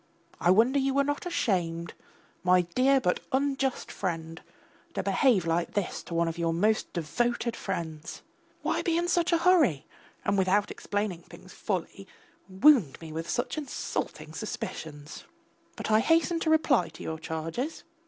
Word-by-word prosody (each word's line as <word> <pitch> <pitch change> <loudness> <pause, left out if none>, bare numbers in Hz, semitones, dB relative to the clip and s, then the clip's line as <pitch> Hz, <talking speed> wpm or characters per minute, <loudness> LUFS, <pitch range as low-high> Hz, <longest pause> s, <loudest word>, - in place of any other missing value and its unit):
I 175 - +2
wonder 230 +9 +5
you 270 0 0
were 280 - +4
not 290 +4 -2
ashamed, 170 - -1 0.5
my 180 0 +5
dear 255 +11 +3
but 180 -8 +1
unjust 270 -1 0
friend, 165 -3 -4 0.5
to - - -1
behave 235 - +3
like 165 +1 0
this 205 -3 -1
to 170 - -6
one 170 0 +2
of 165 +1 -4
your 165 -1 0
most 215 +5 +1
devoted 235 +8 -1
friends. 160 -1 -5 0.4
Why - - 0
be 335 -2 +1
in 345 +1 0
such 345 -1 +2
a 340 - +4
hurry, 330 - +3 0.4
and 200 -1 +2
without 195 +2 +2
explaining 205 -4 -3
things 180 +2 -14
fully, 195 0 -4 0.4
wound 190 - +4
me 160 -1 -9
with 165 +2 -5
such 245 +5 -1
insulting 285 -4 -4
suspicions? 150 -1 -6 0.5
But - - -4
I 215 - +6
hasten 330 +5 +2
to 325 - -1
reply 290 - +3
to 160 - -11
your 160 0 -4
charges. 165 - -4
200 Hz, 155 wpm, -28 LUFS, 165-270 Hz, 0.5 s, I